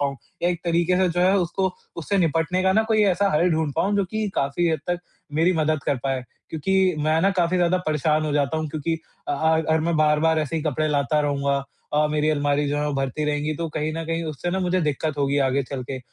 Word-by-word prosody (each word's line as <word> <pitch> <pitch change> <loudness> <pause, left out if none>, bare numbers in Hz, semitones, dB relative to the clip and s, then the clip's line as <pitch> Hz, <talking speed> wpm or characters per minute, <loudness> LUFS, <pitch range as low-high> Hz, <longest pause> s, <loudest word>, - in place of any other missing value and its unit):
पाऊँ। 140 -1 -1 0.3
या 175 - +3
एक 175 -2 -2
तरीक़े 170 +1 +2
से 185 0 +3
जो 175 +1 -1
है 185 +2 +4
उसको 185 +1 -1 0.2
उससे 175 +4 -1
निपटने 165 +2 +1
का 190 0 +3
न 220 +3 +3
कोई 215 -1 +3
ऐसा 200 +3 +1
हल 170 +4 +3
ढूँढ 160 -2 0
पाऊँ 200 +5 +1
जो 200 - +2
कि 215 -1 -1
काफ़ी 140 +5 0
हद 160 - 0
तक 175 - 0 0.4
मेरी 165 +4 +3
मदद 155 -2 0
कर 140 - +1
पाए। 135 -1 -1 0.3
क्योंकि 185 +3 +1
मैं 155 +1 +2
न 195 - +4
काफ़ी 175 0 +2
ज़्यादा 180 +1 +2
परेशान 155 0 +1
हो 150 - -1
जाता 145 +1 +1
हूँ 155 0 -2
क्योंकि 160 +2 -2 0.3
अ - - +1
अ, - - +1 0.2
अगर 160 0 +1
मैं 165 +1 0
बार-बार 155 +1 +3
ऐसे 155 +1 -2
ही 160 - -2
कपड़े 155 0 0
लाता 145 +1 +1
रहूँगा 140 -1 0 0.3
और 150 0 +3
मेरी 150 0 +1
अलमारी 145 -1 +1
जो 145 - -1
है 150 - 0
वो 145 - -1
भरती 135 +2 -2
रहेंगी 150 +1 -1
तो 165 +1 -3
कहीं 155 +1 -1
न 165 0 -4
कहीं 165 0 -2
उससे 155 +3 -4
न 185 - -1
मुझे 180 +1 +1
दिक्कत 150 -1 -2
होगी 140 0 +1
आगे 135 0 +2
चल 130 0 -5
के। 130 - -3
155 Hz, 245 wpm, -23 LUFS, 145-175 Hz, 0.4 s, है